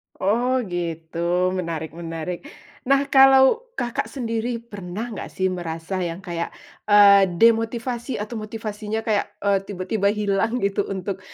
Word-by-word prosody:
Oh 245 +6 +1
gitu, 165 -2 -4 0.3
menarik 165 -4 -3
menarik. 165 - -6 0.4
Nah 275 +1 +4
kalau 270 - +6
Kakak 240 -1 -2
sendiri 235 -2 -2
pernah 205 +1 -6
enggak - - -6
sih 190 - -2
merasa 170 +1 -4
yang 170 -1 -3
kayak, 170 -2 -3 0.4
eee, 200 -1 +7
demotivasi 230 +3 +1
atau 210 +3 -5
motivasinya 215 0 -4
kayak, 210 -2 +1 0.2
eee, 200 -1 +3
tiba-tiba 200 +1 -1
hilang 210 +2 0
gitu 200 0 +1
untuk 190 0 -4
205 Hz, 125 wpm, -23 LUFS, 180-230 Hz, 0.4 s, eee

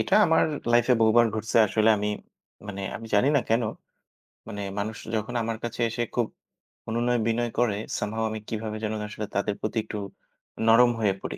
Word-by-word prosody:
এটা - - +1
আমার 160 -1 +4 0.3
লাইফে 120 +1 +4
বহুবার 115 +1 +5
ঘটছে 110 +1 -2
আসলে 110 +1 +2
আমি, 105 +1 -1 0.6
মানে 100 -1 -5
আমি 115 - -9
জানি 105 +6 +4
না - - +4
কেনো? 115 0 +2 0.8
মানে 100 0 -5 0.2
মানুষ 110 +1 -3 0.2
যখন 110 +3 -2
আমার 115 0 -2
কাছে 120 0 -4
এসে 120 +1 -2
খুব 120 -2 +1 0.6
অনুনয়-বিনয় 120 0 +1
করে, 110 -5 +2 0.2
some 105 0 -2
how, 115 - -1
আমি 110 0 -4
কিভাবে 110 -1 -4
যেন 110 - -1
আসলে 105 0 -5
তাদের 100 +1 0
প্রতি 110 - -3
একটু 105 - -6 0.7
নরম 120 +2 +7
হয়ে 105 -3 +2
পড়ি। - - -5
110 Hz, 175 wpm, -26 LUFS, 105-120 Hz, 0.8 s, নরম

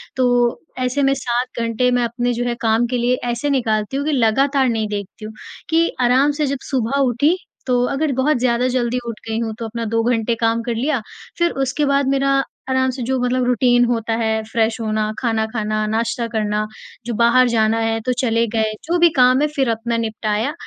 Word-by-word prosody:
तो 245 -2 +2 0.2
ऐसे 255 +3 0
में 270 0 +3
7 245 -2 -2
घंटे 230 +2 +1
में 245 0 +2
अपने 240 +1 -1
जो 240 +1 -2
है 240 -1 -1
काम 225 +1 +2
के 250 +1 -1
लिए 245 +1 +2 0.2
ऐसे 240 +5 -2
निकालती 225 -3 0
हूँ 285 - -2
कि 310 - 0
लगातार 270 +2 +2
नहीं 220 -2 -1
देखती 205 0 -6
हूँ। 215 - -8 0.4
कि 330 +1 +3
आराम 255 +4 +4
से - - +3
जब 275 0 -2
सुबह 265 +1 0
उठी 275 +7 +2 0.3
तो 245 -1 +2
अगर 290 +2 -1
बहुत 265 +3 +1
ज़्यादा 245 0 +1
जल्दी 250 -1 0
उठ 230 -2 -5
गई 225 0 -2
हूँ 225 -1 -2
तो 230 - -4
अपना 230 +1 -5
2 225 +1 0
घंटे 235 -1 +1
काम 230 0 0
कर 235 0 -2
लिया। 265 +2 0 0.4
फिर 345 0 +2
उसके 270 +3 -1
बाद 280 -1 +2
मेरा 275 0 +1 0.4
आराम 260 0 +2
से 255 0 -7
जो 260 +2 -1
मतलब 250 +1 0
रूटीन 245 0 +3
होता 230 -1 -1
है। 220 -1 0
फ्रेश 225 +1 -1
होना, 215 -1 -1
खाना 225 -3 0
खाना, 215 -1 -2
नाश्ता 230 +2 -1
करना, 215 -2 -1 0.4
जो 240 - -3
बाहर 235 +3 +4
जाना 225 -1 +2
है 225 0 0
तो 255 - +1
चले 230 -2 +2
गए। 220 -1 +1
जो 340 +3 +1
भी 345 0 +6
काम 255 +1 +5
है 300 - +3
फिर 270 -3 +1
अपना 230 +1 -1
निपटाया। 220 +3 -2
240 Hz, 210 wpm, -19 LUFS, 225-260 Hz, 0.4 s, भी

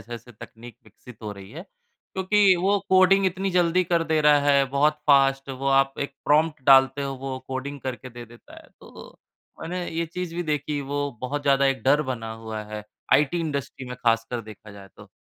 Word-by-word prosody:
जैसे-जैसे 120 +1 -10
तकनीक 120 +1 -14
विकसित 110 +2 -16
हो 105 - -5
रही 100 -1 -12
है, 160 +8 -9 0.5
क्योंकि 190 +1 +3
वो 200 +2 +2
कोडिंग 190 +1 +5
इतनी 190 +1 -2
जल्दी 180 0 +2
कर 170 -1 0
दे 160 -1 +1
रहा 150 -1 +5
है, 140 -1 +4
बहुत 150 +2 +2
फास्ट। 135 -1 +3
वो 135 +1 -5
आप 135 0 +3
एक 140 - -4
प्रॉम्प्ट 155 0 +2
डालते 135 0 +5
हो, 135 -1 -3
वो 130 0 -5
कोडिंग 135 +2 -5
करके 130 0 -6
दे 120 0 -10
देता 120 +1 -16
है, - - -21
तो - - -14 0.4
मैंने 175 +2 -4
ये 165 +1 -3
चीज़ 175 +1 -6
भी 175 - -2
देखी। 150 -2 -2
वो 145 +1 -3
बहुत 145 +3 -3
ज़्यादा 140 -1 +3
एक 135 -1 -1
डर 145 +3 +3
बना 115 -2 -6
हुआ 110 -1 -7
है 105 -1 -6 0.3
आईटी 150 +4 +3
इंडस्ट्री 140 -4 -5
में 125 - -7
ख़ासकर 115 +1 +1
देखा 105 0 -13
जाए 100 -1 -13
तो। - - -14
140 Hz, 195 wpm, -24 LUFS, 125-165 Hz, 0.5 s, कोडिंग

